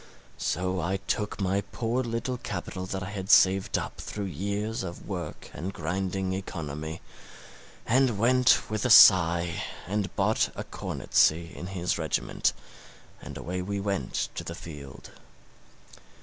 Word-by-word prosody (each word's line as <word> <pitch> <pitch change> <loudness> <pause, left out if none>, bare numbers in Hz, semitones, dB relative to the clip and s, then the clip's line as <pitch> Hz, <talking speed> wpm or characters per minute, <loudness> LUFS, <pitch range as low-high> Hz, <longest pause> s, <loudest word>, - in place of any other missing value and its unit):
So 90 +1 -1
I 95 +4 0
took 105 +2 -3
my 100 0 +1
poor 120 +2 -1
little 120 +1 -3
capital 95 -2 -5
that 95 0 -3
I 95 - -6
had 95 -2 -5
saved 95 +1 +5
up - - -5
through 105 -1 -5
years 100 +5 -3
of 85 -2 -7
work 90 -6 -6
and 90 +6 -4
grinding 95 +3 -2
economy, 80 -4 -5 0.8
and 125 -2 +3
went 125 +3 +4
with 110 -1 -2
a 125 - +1
sigh 85 -5 +7 0.2
and 100 +2 -2
bought - - +2
a - - -4
cornetcy 85 +2 +1
in 90 - -6
his 90 -2 -2
regiment, - - 0 0.7
and - - -8
away 90 +2 -4
we 100 +2 -3
went 100 -9 -2
to - - -5
the 85 - -6
field. 75 -5 -10
95 Hz, 140 wpm, -28 LUFS, 85-105 Hz, 0.8 s, sigh